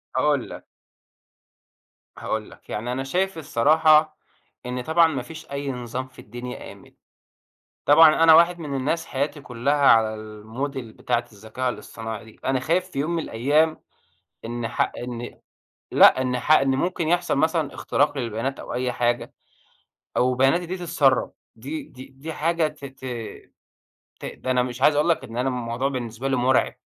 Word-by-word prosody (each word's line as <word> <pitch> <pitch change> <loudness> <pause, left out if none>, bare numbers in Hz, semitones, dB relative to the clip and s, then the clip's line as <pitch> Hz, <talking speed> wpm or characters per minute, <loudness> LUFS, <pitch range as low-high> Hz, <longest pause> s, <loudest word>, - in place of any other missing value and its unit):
هاقول - - +1
لك - - -10 1.5
هاقول - - -3
لك، - - -18
يعني 115 +4 -3
أنا 130 +1 -2
شايف 185 +7 -1
الصراحة 155 +2 +3 0.5
إن 125 0 -3
طبعًا 160 +5 +4
ما 140 -5 -3
فيش 160 +4 -11
أي 140 0 -3
نظام 125 +1 -5
في 130 - -19
الدنيا 120 +3 -8
آمن. - - -16 0.9
طبعًا 155 +2 +7
أنا 160 -1 +8
واحد 170 +2 +5
من 150 -4 -5
الناس 150 +5 -1
حياتي 145 +2 -2
كلّها 125 +2 -1
على 115 -6 +4
الmodel 110 +6 -6
بتاعة 120 0 -2
الذكاء 110 +5 -4
الاصطناعي 110 -2 -7
دي، 110 - -17
أنا 130 -1 +1
خايف 180 +7 0
في 135 - -6
يوم 150 +4 -1
من 170 -1 -1
الأيام 150 +7 +1 0.7
إن 120 0 -3
ح - - 0
إن 120 -1 -7 0.5
لأ، 130 - +7
إن 125 -1 -1
ح 135 - -1
إن 135 -3 +5
ممكن 170 +3 -1
يحصل 175 -2 +1
مثلًا 160 -1 +1
اختراق 145 0 0
للبيانات 120 +2 -3
أو - - -7
أي 125 +1 -1
حاجة، 120 0 -1 0.8
أو 125 +1 +3
بياناتي 135 +8 +2
دي 185 +3 -4
تتسرب. 160 -7 +1 0.2
دي 140 +7 -6
دي 130 0 -12
دي 135 +4 -8
حاجة 165 +1 +1
ت 150 -2 -13
ت 135 -1 -11 1.2
ت - - -8
ده 130 - -4
أنا 125 -1 +3
مش 125 0 -6
عايز 145 +2 +5
أقول 150 +3 +2
لك 165 - +2
إن 115 +1 -8
أنا 125 +2 +1
الموضوع 125 +1 -2
بالنسبة 120 -1 -4
لي 135 - +1
مُرعب. 125 0 +2
135 Hz, 165 wpm, -24 LUFS, 120-155 Hz, 1.5 s, أنا